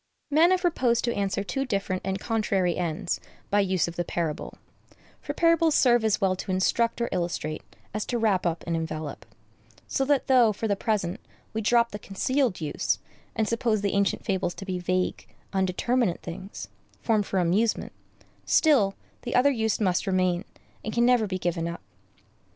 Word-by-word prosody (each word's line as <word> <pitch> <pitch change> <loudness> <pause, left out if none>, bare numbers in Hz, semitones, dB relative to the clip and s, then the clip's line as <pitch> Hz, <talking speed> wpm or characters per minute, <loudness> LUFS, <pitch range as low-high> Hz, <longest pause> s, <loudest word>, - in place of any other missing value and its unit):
Men 320 +4 +6
have 370 0 +2
proposed 255 -10 +2
to 235 - 0
answer 200 0 -1
two 235 +8 -2
different 195 -6 -2
and 190 0 -1
contrary 200 -6 0
ends 175 +2 -2 0.3
by 205 0 +4
the 195 - 0
use 185 -3 +2
of 170 - -6
parable; 160 -3 -3 0.6
for - - -5
parables 330 -2 +4
serve 240 -3 +4
as 220 -2 +2
well 190 -2 +2
to - - -7
instruct 230 +6 +1
or 235 - 0
illustrate 170 -4 -2 0.3
as 210 0 -1
to 245 - -1
wrap 210 -5 +2
up 170 -1 -1
and 170 - -1
envelop; 160 -2 -5 0.6
so 270 - 0
that 280 -1 +2
though, 245 -5 +5
for 220 +2 -3
the 200 - +1
present, 195 -5 -1 0.3
we 220 - -1
drop 235 +2 +3
the 205 - -6
concealed 245 +3 0
use, 155 -3 -1 0.4
and 220 -1 +1
suppose 230 -2 +1
the 200 -1 0
ancient 200 -1 +1
fables 190 -4 -1
to 195 - -8
be 185 -2 -3
vague, 185 +1 -1 0.3
undeterminate 190 +2 +1
things, 185 +3 -7 0.4
formed 215 -3 +2
for 195 - -1
amusement, 190 +6 +1 0.5
still, 245 -12 +4 0.3
the 240 - -4
other 270 +3 +5
use 220 -4 0
must 190 -1 +1
remain, 185 0 +1 0.4
and 220 - -4
can 235 0 +4
never 245 -3 +4
be 185 -1 -2
given 170 -2 -1
up. 170 0 -6
200 Hz, 175 wpm, -26 LUFS, 185-235 Hz, 0.6 s, Men